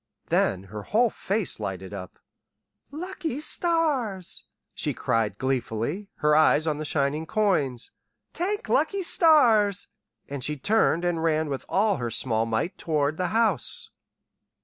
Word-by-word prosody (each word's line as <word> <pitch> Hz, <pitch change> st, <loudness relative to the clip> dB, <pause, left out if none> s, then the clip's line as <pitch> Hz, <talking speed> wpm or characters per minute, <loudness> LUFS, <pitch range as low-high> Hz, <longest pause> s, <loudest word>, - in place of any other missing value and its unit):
Then 95 Hz, 0 st, +1 dB
her 105 Hz, +2 st, -8 dB
whole 225 Hz, -, +2 dB
face 200 Hz, -, -1 dB
lighted 95 Hz, -2 st, -5 dB
up. 90 Hz, -3 st, -8 dB, 0.7 s
"Lucky 320 Hz, -3 st, -5 dB
stars!" 295 Hz, -, 0 dB, 0.3 s
she -, -, -2 dB
cried 110 Hz, -3 st, 0 dB
gleefully, 130 Hz, -, -2 dB
her 150 Hz, 0 st, +2 dB
eyes 155 Hz, 0 st, +4 dB
on 150 Hz, -2 st, -1 dB
the 155 Hz, -, -4 dB
shining 150 Hz, +2 st, 0 dB
coins. 155 Hz, -, 0 dB, 0.4 s
"T'ank 405 Hz, +6 st, -2 dB
lucky 395 Hz, -1 st, +1 dB
stars!" 230 Hz, -, +4 dB, 0.4 s
And 140 Hz, -2 st, -5 dB
she 150 Hz, +2 st, -2 dB
turned 180 Hz, 0 st, +2 dB
and 170 Hz, -2 st, 0 dB
ran 160 Hz, -1 st, +1 dB
with 135 Hz, -2 st, -5 dB
all 205 Hz, +1 st, +2 dB
her 120 Hz, -3 st, -3 dB
small 115 Hz, -1 st, +1 dB
might 115 Hz, -, -2 dB
toward 150 Hz, -1 st, 0 dB
the 180 Hz, -, 0 dB
house. 220 Hz, -3 st, 0 dB
160 Hz, 135 wpm, -26 LUFS, 130-220 Hz, 0.7 s, eyes